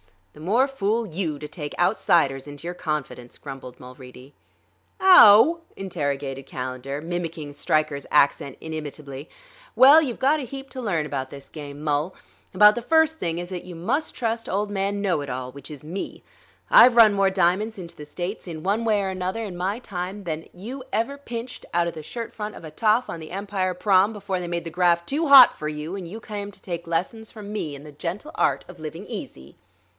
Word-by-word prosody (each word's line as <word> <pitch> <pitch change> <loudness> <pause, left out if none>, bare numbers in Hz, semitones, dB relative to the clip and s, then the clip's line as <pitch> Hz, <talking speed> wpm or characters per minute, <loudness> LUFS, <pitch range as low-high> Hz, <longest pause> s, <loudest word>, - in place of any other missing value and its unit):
"The - - -15
more 220 - +2
fool 230 -3 -1
you, 165 -4 -3
to 150 +1 -7
take 150 -2 -7
outsiders 165 -7 +2
into 145 +2 -10
your 175 - -3
confidence," 150 -7 -5
grumbled 135 -3 -9
Mulready. 125 +1 -13 0.7
"Ow?" 330 - +8 0.2
interrogated 140 -7 -4
Calendar, 130 +2 -5
mimicking 165 -3 -5
Stryker's 150 -1 0
accent 140 -1 +2
inimitably. 150 -2 -7 0.5
"Well, 285 +5 +8
you've 255 -7 -3
got 290 +4 +3
a - - -4
heap 270 +2 -8
to 260 - -6
learn 170 -9 -1
about 135 -3 -4
this 140 -1 -11
game, 145 -1 -9
Mul; 150 +4 -1 0.4
about 210 +2 +7
the 240 - -4
first 320 +4 +3
thing 165 0 -2
is 175 0 -5
that 180 -2 -6
you 180 -1 -9
must 235 - -2
trust 230 -1 -2
Old 205 +2 -1
Man 200 0 -1
Know 185 -6 +1
it 140 - -6
all, 130 0 -4
which 140 0 -10
is 150 -2 -10
me. 175 +6 -6 0.5
I've 245 -1 +8
run 225 -3 +8
more 195 -1 +3
diamonds 190 +4 +1
into 170 -3 -9
the 150 - -10
States, 180 +7 -5
in 160 -2 -7
one 210 +4 0
way 210 -3 +2
or 190 - -1
another, 185 +4 -3
in 195 -5 -6
my 190 +4 -2
time, 195 -2 -6
than 160 -2 -5
you 245 +9 -8
ever 270 +6 -1
pinched 245 -2 -7
out 170 0 +3
of 170 - -3
the 155 - -7
shirt 230 +7 -6
front 210 -1 -6
of - - -11
a 155 - -8
toff 220 +7 +2
on 165 - -6
the 155 - -10
Empire 195 -1 -2
Prom., 195 +3 +3
before 195 -3 -3
they 175 - -5
made 170 0 -3
the 165 - -7
graft 170 0 +2
too 305 +4 0
hot 275 -3 +9
for 150 - -4
you 155 +4 -5
and 190 -3 -6
you 210 +7 -8
came 205 -2 -6
to - - -20
take 170 -2 -6
lessons 185 +7 -2
from 210 -1 -9
me 155 -9 -3
in 140 - -11
the 150 - -11
gentle 175 - -5
art - - +1
of 180 -2 -13
living 160 +5 -7
easy." 75 - -8
180 Hz, 205 wpm, -24 LUFS, 150-215 Hz, 0.7 s, hot